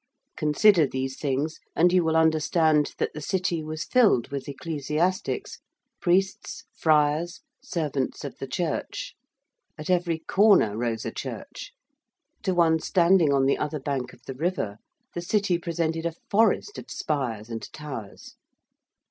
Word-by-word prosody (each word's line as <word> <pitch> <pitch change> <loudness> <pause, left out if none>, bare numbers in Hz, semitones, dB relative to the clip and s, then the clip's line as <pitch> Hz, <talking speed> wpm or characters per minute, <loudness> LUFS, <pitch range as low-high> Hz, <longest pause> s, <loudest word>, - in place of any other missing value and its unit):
Consider 155 +2 +4
these 130 0 -3
things 145 +2 -1 0.2
and 175 +2 +4
you 180 -1 +4
will 160 0 +1
understand 160 -1 +3
that - - -1
the 155 - -7
City 180 0 -1
was 155 +1 -4
filled 220 - +3
with 140 -1 -5
ecclesiastics 155 +5 -2 0.4
priests, 190 +2 0
friars, 155 +2 +2 0.2
servants 145 -6 -2
of - - -6
the - - -5
Church: - - -3 0.6
at 155 +3 -3
every 175 -2 +1
corner 190 - +4
rose 115 -1 -2
a - - -2
church: - - -7 0.7
to 185 - 0
one 165 -2 +4
standing 175 -3 +3
on 135 -1 +3
the 135 - +2
other 150 0 -2
bank 135 -2 -3
of - - -19
the 135 - -5
river 130 - -2 0.3
the 175 - -3
City 185 -1 +1
presented 165 -1 -1
a 165 - -5 0.2
forest 225 - +2
of - - -11
spires 120 -8 -3
and 115 -2 -6
towers. 140 -9 -8
160 Hz, 140 wpm, -26 LUFS, 140-175 Hz, 0.7 s, Consider